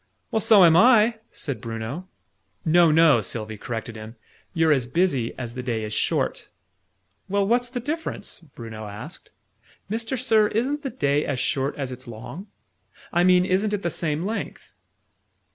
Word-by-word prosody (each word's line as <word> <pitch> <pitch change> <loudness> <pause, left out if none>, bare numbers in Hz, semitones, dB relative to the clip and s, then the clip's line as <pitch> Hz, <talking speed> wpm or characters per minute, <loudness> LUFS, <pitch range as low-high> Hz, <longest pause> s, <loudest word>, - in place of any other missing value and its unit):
"Well, 220 - +1
so 205 -4 +7
am 165 -1 +6
I!" 225 +2 +5
said 140 -4 -5
Bruno. 115 +9 -5 0.6
"No, 170 +1 +5
no!" 155 -6 +5
Sylvie 110 0 -4
corrected 115 0 -5
him. 110 +1 -9 0.4
"You're 165 -2 +2
as 130 -5 +2
busy 140 -6 0
as 120 -2 -6
the 125 - -5
day 120 -3 -2
is 105 0 -4
short!" - - -1 0.8
"Well, 200 +1 +1
what's 245 +2 +2
the 245 0 -4
difference?" 295 -4 -4
Bruno 115 -9 -9
asked. 105 0 -9 0.6
"Mister 225 +4 -2
Sir, 225 -4 +3
isn't 260 +8 -1
the 275 - -3
day 145 - 0
as 140 -3 -2
short 135 +3 -1
as 135 -3 -4
it's 130 0 -9
long? 125 - -8 0.7
I 175 0 +3
mean, 180 0 +5
isn't 195 +3 +1
it 205 - -2
the 170 - 0
same 155 +1 -2
length?" 220 +3 -5
165 Hz, 160 wpm, -24 LUFS, -, 0.8 s, so